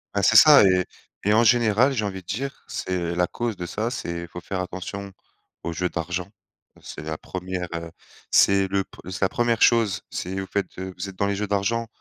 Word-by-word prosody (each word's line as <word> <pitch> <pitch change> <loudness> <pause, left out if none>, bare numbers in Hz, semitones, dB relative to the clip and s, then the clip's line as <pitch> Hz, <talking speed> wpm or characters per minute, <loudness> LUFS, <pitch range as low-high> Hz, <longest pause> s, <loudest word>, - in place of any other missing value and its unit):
Bah 100 - +1
c'est 110 - +4
ça 150 -4 +9
et 90 -2 +3 0.4
et 105 - +4
en 115 +2 +5
général, 120 +2 +4
j'ai 110 -5 -1
envie 95 -2 -4
de - - -30
dire, 135 +9 -5
c'est 90 -2 -2
la 90 0 +1
cause 120 -5 -3
de 90 - -4
ça, 110 +7 -3
c'est 85 -8 -4
faut 90 - -8
faire 95 +1 -4
attention 95 +2 -6 0.5
aux 85 - -3
jeux 90 +2 -1
d'argent. 90 +2 -3 0.5
C'est - - -8
la 80 0 -4
1re 90 -1 -5
heu, 85 0 -6 0.4
c'est 100 -1 +5
le 100 0 +1
p - - -49 0.2
c'est 95 - -6
la 95 - +3
1re 120 -2 0
chose, 115 -6 +4
c'est 95 +2 -4
vous 95 - -5
faites 100 +1 -1
de 95 0 -5
vous 95 +2 -4
êtes 95 - -11
dans 100 - +1
les 100 - 0
jeux 105 +1 -2
d'argent, 115 +4 0
95 Hz, 220 wpm, -24 LUFS, 90-110 Hz, 0.5 s, ça